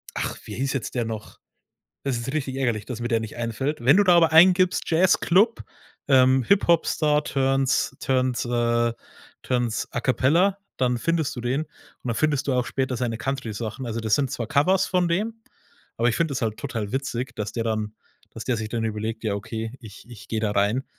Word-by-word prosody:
Ach, -, -, -3 dB
wie -, -, -7 dB
hieß 135 Hz, +2 st, -1 dB
jetzt 135 Hz, -, -3 dB
der 120 Hz, -2 st, 0 dB
noch? 110 Hz, -1 st, -7 dB, 0.6 s
Es 135 Hz, -3 st, -1 dB
ist 120 Hz, +4 st, -5 dB
richtig 135 Hz, -4 st, -2 dB
ärgerlich, 120 Hz, -6 st, -1 dB
dass 120 Hz, -2 st, -6 dB
mir 120 Hz, -, -2 dB
der 115 Hz, -2 st, +2 dB
nicht 110 Hz, -1 st, -7 dB
einfällt. 120 Hz, +4 st, -3 dB
Wenn 135 Hz, +8 st, +6 dB
du 205 Hz, -, +5 dB
da 180 Hz, -, +6 dB
aber 165 Hz, -1 st, +5 dB
eingibst, 180 Hz, +3 st, +5 dB
Jazzclub, 185 Hz, +5 st, +3 dB, 0.4 s
ähm, 130 Hz, -1 st, +5 dB
Hip-Hop-Star 160 Hz, -, +2 dB
turns 135 Hz, 0 st, +1 dB
turns 130 Hz, -2 st, 0 dB
äh, 120 Hz, -1 st, +1 dB, 0.5 s
turns 120 Hz, -4 st, -1 dB
A-Cappella, 150 Hz, +10 st, +2 dB, 0.2 s
dann 125 Hz, -1 st, +1 dB
findest 160 Hz, +2 st, -1 dB
du 120 Hz, -, -5 dB
den 125 Hz, +5 st, 0 dB
und 150 Hz, -, -21 dB, 0.4 s
dann 120 Hz, -2 st, -1 dB
findest 150 Hz, -1 st, 0 dB
du 135 Hz, -, +2 dB
auch 125 Hz, -1 st, +1 dB
später 130 Hz, +1 st, -2 dB
seine 115 Hz, -2 st, -2 dB
Country-Sachen. 120 Hz, -2 st, -4 dB
Also 115 Hz, 0 st, -3 dB
das 110 Hz, -1 st, +2 dB
sind 135 Hz, -3 st, -1 dB
zwar 115 Hz, -, -3 dB
Covers 180 Hz, -, +3 dB
von 180 Hz, -1 st, +1 dB
dem, 220 Hz, +6 st, -2 dB, 0.6 s
aber 115 Hz, -, +2 dB
ich 115 Hz, -, -1 dB
finde 165 Hz, -3 st, 0 dB
das 130 Hz, -, -3 dB
halt 110 Hz, -2 st, -1 dB
total 115 Hz, -7 st, -4 dB
witzig, 135 Hz, -2 st, -3 dB
dass 105 Hz, 0 st, -4 dB
der 115 Hz, -1 st, -2 dB
dann 110 Hz, -1 st, -2 dB, 0.4 s
dass 115 Hz, -, -8 dB
der 125 Hz, -, +1 dB
sich 110 Hz, 0 st, -4 dB
dann 115 Hz, 0 st, -2 dB
überlegt: 110 Hz, +1 st, -4 dB
„Ja 105 Hz, -, 0 dB
okay, 110 Hz, +3 st, -5 dB
ich 105 Hz, -3 st, -12 dB
ich 115 Hz, -5 st, -12 dB
gehe 110 Hz, -, -1 dB
da 110 Hz, -1 st, 0 dB
rein 105 Hz, +6 st, +1 dB
125 Hz, 195 wpm, -24 LUFS, 115-145 Hz, 0.6 s, Wenn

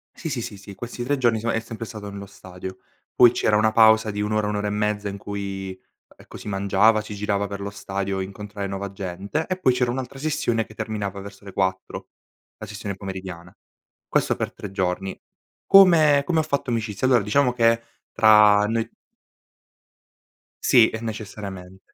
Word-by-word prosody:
Sì, 165 Hz, -, -5 dB
sì, 130 Hz, -5 st, -2 dB
sì, 105 Hz, -2 st, -7 dB
sì. 100 Hz, 0 st, -11 dB
Questi 120 Hz, +2 st, -6 dB
3 140 Hz, +3 st, 0 dB
giorni 120 Hz, -3 st, +2 dB
soma 115 Hz, +2 st, -1 dB
è 115 Hz, -, +1 dB
sempre 115 Hz, 0 st, -7 dB
stato 105 Hz, -2 st, -8 dB
nello 100 Hz, 0 st, -7 dB
stadio. 95 Hz, -1 st, -10 dB, 0.4 s
Poi 120 Hz, -1 st, +7 dB
c'era 105 Hz, -3 st, +1 dB
una 110 Hz, +1 st, +3 dB
pausa 110 Hz, -1 st, +5 dB
di 105 Hz, 0 st, -3 dB
1 105 Hz, +1 st, -2 dB
ora, 105 Hz, -1 st, +1 dB
1 105 Hz, -, -2 dB
ora 105 Hz, 0 st, -1 dB
e -, -, 0 dB
mezza, 105 Hz, 0 st, -1 dB
in 100 Hz, -, -6 dB
cui, 95 Hz, -2 st, -6 dB, 0.4 s
ecco, -, -, -13 dB
si -, -, -10 dB
mangiava, 100 Hz, +2 st, +3 dB
si 105 Hz, -1 st, -8 dB
girava 100 Hz, 0 st, -1 dB
per 100 Hz, 0 st, -6 dB
lo 100 Hz, -, -4 dB
stadio 100 Hz, -1 st, -4 dB
a -, -, -1 dB
incontrare 100 Hz, +1 st, -6 dB
nuova 100 Hz, 0 st, -5 dB
gente 100 Hz, -, -4 dB
e 185 Hz, -, -2 dB
poi 130 Hz, -9 st, +3 dB
c'era 125 Hz, -1 st, 0 dB
un'altra 130 Hz, +1 st, -5 dB
sessione 145 Hz, -7 st, 0 dB
che 110 Hz, -, -15 dB
terminava 105 Hz, -2 st, -4 dB
verso 100 Hz, 0 st, -12 dB
le 100 Hz, -, -10 dB
4, 95 Hz, -1 st, -2 dB, 0.5 s
la -, -, -8 dB
sessione 100 Hz, -1 st, -6 dB
pomeridiana. 95 Hz, -3 st, -8 dB, 0.5 s
Questo -, -, +1 dB
per -, -, -4 dB
3 100 Hz, -, -8 dB
giorni. 95 Hz, 0 st, -2 dB, 0.5 s
Come 160 Hz, -7 st, +6 dB
come 165 Hz, -1 st, +1 dB
ho -, -, +2 dB
fatto 140 Hz, -3 st, -2 dB
amicizia? 110 Hz, +1 st, -1 dB
Allora 120 Hz, -5 st, +4 dB
diciamo 125 Hz, +4 st, +2 dB
che 115 Hz, -1 st, +3 dB, 0.3 s
tra 105 Hz, -2 st, +6 dB
noi 115 Hz, 0 st, -2 dB, 1.7 s
Sì, 120 Hz, -4 st, +5 dB
e 110 Hz, -, -3 dB
necessariamen 100 Hz, -4 st, -7 dB
105 Hz, 185 wpm, -23 LUFS, 100-115 Hz, 1.7 s, Poi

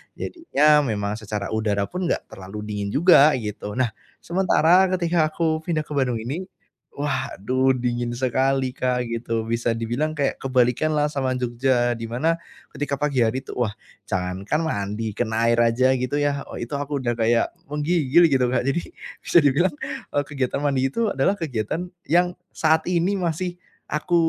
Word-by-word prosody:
Jadinya 150 Hz, -, +2 dB
memang 105 Hz, -1 st, -2 dB
secara 105 Hz, -2 st, -4 dB
udara 105 Hz, -2 st, 0 dB
pun 180 Hz, 0 st, -2 dB
enggak -, -, 0 dB
terlalu 95 Hz, +3 st, -8 dB
dingin 105 Hz, -1 st, -3 dB
juga 155 Hz, -2 st, +6 dB
gitu. 105 Hz, -3 st, -5 dB
Nah, 125 Hz, -3 st, +1 dB, 0.3 s
sementara 180 Hz, 0 st, +4 dB
ketika 170 Hz, -3 st, +2 dB
aku 155 Hz, 0 st, 0 dB
pindah 160 Hz, -1 st, -2 dB
ke 150 Hz, -, -18 dB
Bandung 130 Hz, -4 st, +1 dB
ini, 155 Hz, +10 st, -4 dB, 0.5 s
waduh 130 Hz, -2 st, 0 dB
dingin 120 Hz, -1 st, -2 dB
sekali 130 Hz, +1 st, +1 dB
Kak, 125 Hz, -1 st, -1 dB
gitu 115 Hz, -1 st, -2 dB
bisa 115 Hz, +1 st, -1 dB
dibilang 120 Hz, +8 st, -2 dB
kayak 140 Hz, -2 st, -1 dB
kebalikanlah 135 Hz, +4 st, +1 dB
sama 130 Hz, -3 st, -1 dB
Jogja, 120 Hz, 0 st, +1 dB
di 115 Hz, -1 st, -4 dB
mana 160 Hz, +9 st, 0 dB, 0.3 s
ketika 145 Hz, -1 st, -2 dB
pagi 140 Hz, -2 st, -1 dB
hari 120 Hz, +3 st, +1 dB
itu -, -, -9 dB
wah 110 Hz, -4 st, -2 dB, 0.3 s
jangankan 95 Hz, -, -2 dB
mandi, 105 Hz, -5 st, -2 dB
kena 110 Hz, +1 st, -1 dB
air 115 Hz, -, +2 dB
aja 120 Hz, +3 st, +3 dB
gitu, 125 Hz, +3 st, -2 dB
ya, 145 Hz, -1 st, 0 dB
oh, -, -, -8 dB
itu 120 Hz, -, -6 dB
aku 140 Hz, -1 st, -3 dB
udah 120 Hz, -, +1 dB
kayak 115 Hz, +1 st, +2 dB, 0.2 s
menggigil 155 Hz, +2 st, +3 dB
gitu 130 Hz, -2 st, +3 dB
Kak. 125 Hz, +1 st, 0 dB
Jadi 140 Hz, +6 st, -2 dB, 0.2 s
bisa -, -, +2 dB
dibilang, 145 Hz, +4 st, +2 dB, 0.4 s
eee, 145 Hz, -, +2 dB
kegiatan 135 Hz, -3 st, -2 dB
mandi 135 Hz, -2 st, +2 dB
itu 220 Hz, -, -1 dB
adalah 135 Hz, +9 st, +1 dB
kegiatan 155 Hz, -, -3 dB, 0.2 s
yang 175 Hz, +2 st, +3 dB, 0.2 s
saat 160 Hz, 0 st, +2 dB
ini 180 Hz, +3 st, +1 dB
masih 175 Hz, +1 st, -2 dB, 0.3 s
aku 150 Hz, +4 st, 0 dB
130 Hz, 160 wpm, -23 LUFS, 115-155 Hz, 0.5 s, juga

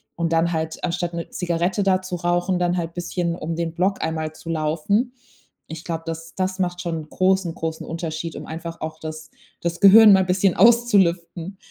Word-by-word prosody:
Und 165 Hz, -1 st, -1 dB
dann 165 Hz, +1 st, +2 dB
halt 160 Hz, -1 st, -3 dB
anstatt 175 Hz, 0 st, -2 dB
'ne 170 Hz, 0 st, -5 dB
Zigarette 175 Hz, +3 st, -1 dB
da 190 Hz, -1 st, +2 dB
zu 185 Hz, -1 st, -5 dB
rauchen, 175 Hz, +1 st, 0 dB
dann 175 Hz, 0 st, +1 dB
halt 170 Hz, -2 st, -3 dB
bisschen 175 Hz, -1 st, -2 dB
um 165 Hz, 0 st, -4 dB
den 165 Hz, -1 st, -3 dB
Block 185 Hz, +3 st, 0 dB
einmal 160 Hz, -1 st, -3 dB
zu 165 Hz, -, -11 dB
laufen. 165 Hz, +10 st, 0 dB, 0.6 s
Ich 160 Hz, 0 st, -7 dB
glaube, 165 Hz, -1 st, -4 dB
das 165 Hz, 0 st, -6 dB
das 185 Hz, 0 st, -1 dB
macht 175 Hz, -1 st, -1 dB
schon 170 Hz, -2 st, -3 dB
'n 155 Hz, -, -17 dB
großen 185 Hz, -2 st, +1 dB
großen 160 Hz, 0 st, -4 dB
Unterschied, 165 Hz, -1 st, -5 dB
um -, -, -8 dB
einfach 165 Hz, +1 st, -7 dB
auch 155 Hz, 0 st, -5 dB
das 155 Hz, 0 st, -7 dB, 0.3 s
das 170 Hz, 0 st, -2 dB
Gehirn 210 Hz, +3 st, +9 dB
mal 190 Hz, -, +5 dB
'n -, -, 0 dB
bisschen 185 Hz, 0 st, +2 dB
auszulüften. 195 Hz, -6 st, +3 dB
170 Hz, 195 wpm, -22 LUFS, 165-185 Hz, 0.6 s, Gehirn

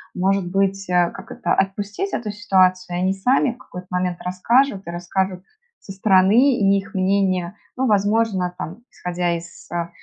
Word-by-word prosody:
Может 190 Hz, 0 st, +1 dB
быть, 195 Hz, 0 st, 0 dB
а, 175 Hz, -1 st, +3 dB
как -, -, -11 dB
это, 175 Hz, -, -1 dB
отпустить 205 Hz, -, -2 dB
эту 215 Hz, -3 st, -2 dB
ситуацию, 185 Hz, -4 st, +1 dB
и -, -, -1 dB
они 190 Hz, +1 st, +2 dB
сами 245 Hz, +6 st, +2 dB
в 235 Hz, -, -13 dB
какой-то 180 Hz, -5 st, -11 dB
момент 180 Hz, -1 st, -1 dB
расскажут, 200 Hz, +3 st, +1 dB
и -, -, -4 dB
расскажут 180 Hz, +2 st, -2 dB, 0.4 s
со 195 Hz, -, -11 dB
стороны? 195 Hz, +7 st, +4 dB
И 200 Hz, -1 st, +4 dB
их 205 Hz, +3 st, -6 dB
мнение, 190 Hz, -1 st, 0 dB, 0.2 s
ну, 260 Hz, 0 st, 0 dB
возможно 205 Hz, -3 st, +1 dB
там, 170 Hz, +5 st, -6 dB
исходя 175 Hz, -1 st, -2 dB
из, 170 Hz, 0 st, -10 dB
а, 170 Hz, -1 st, -2 dB
190 Hz, 170 wpm, -21 LUFS, 180-205 Hz, 0.4 s, стороны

